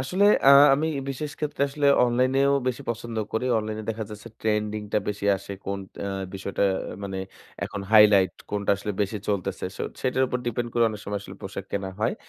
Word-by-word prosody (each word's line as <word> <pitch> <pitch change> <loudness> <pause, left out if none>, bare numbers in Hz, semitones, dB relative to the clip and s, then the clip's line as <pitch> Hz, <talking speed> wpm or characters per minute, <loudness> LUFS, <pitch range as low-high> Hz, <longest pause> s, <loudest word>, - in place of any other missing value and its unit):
আসলে 180 +10 +1 0.2
আ - - +10 0.2
আমি 155 +3 0 0.2
বিশেষ 145 +2 -4
ক্ষেত্রে 150 -2 -2
আসলে 145 0 -1 0.2
অনলাইনেও 130 +3 +2 0.2
বেশি 125 - -3
পছন্দ 115 0 -5 0.2
করি। 110 +3 -1
অনলাইনে 110 0 -4
দেখা 110 0 -4
যাচ্ছে 105 +2 -9
ট্রেন্ডিং 105 -1 -1
টা - - +4
বেশি 100 0 -3
আসে 100 +1 -8
কোন 100 0 -2 0.3
আ - - -2 0.3
বিষয়টা 100 +1 -1 0.4
মানে, 95 -1 -4 0.5
এখন 100 - -5
হাইলাইট 105 -3 +7 0.2
কোনটা 100 -1 -1
আসলে 105 +1 -4
বেশি 100 +1 -3
চলতেছে। 100 -4 -2
সো - - -4 0.2
সেটার 130 0 +1
উপর 125 - -2
ডিপেন্ড 120 0 -1
করে 120 -1 +3
অনেক 105 -2 -7
সময় 100 0 -3
আসলে 95 0 -10
পোশাক 95 0 -6
কেনা 95 -1 -2
হয়। 115 +3 +1
110 Hz, 185 wpm, -25 LUFS, 100-125 Hz, 0.5 s, আ